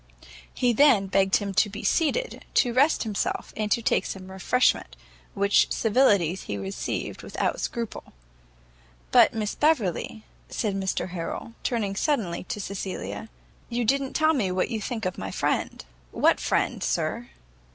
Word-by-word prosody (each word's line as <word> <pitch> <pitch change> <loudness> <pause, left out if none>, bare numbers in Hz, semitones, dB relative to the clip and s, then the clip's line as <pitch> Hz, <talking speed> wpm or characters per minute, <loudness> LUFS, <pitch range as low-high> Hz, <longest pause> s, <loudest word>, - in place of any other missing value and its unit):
He 245 -1 +1
then 240 -5 +5
begged 195 0 +2
him 200 -2 -1
to 205 - +3
be 205 +1 -7
seated, 485 +10 0
to 245 -2 +3
rest 280 +6 +3
himself, 215 -3 -3
and 210 -1 -2
to 235 - +2
take - - +1
some 190 -1 -7
refreshment; 225 +7 +1 0.4
which 200 0 +3
civilities 205 - +2
he 100 - -3
received 95 0 -4
without - - -2
scruple. 230 -2 -4 1.1
"But, - - +6
Miss 215 -1 -2
Beverley," 225 - 0 0.3
said 210 -3 -1
Mr 190 -1 -2
Harrel, 175 +6 -5
turning 210 -5 -1
suddenly 200 - -1
to 210 - -4
Cecilia, 200 +2 -5 0.4
"you 240 0 -1
don't 270 +3 0
tell 315 0 +4
me 225 -11 0
what 185 +6 0
you 220 -2 -2
think 220 0 -4
of 185 - -3
my 95 - -4
friend?" 90 - -2 0.2
"What - - +3
friend, - - 0
sir?" - - -1
210 Hz, 150 wpm, -26 LUFS, 190-245 Hz, 1.1 s, But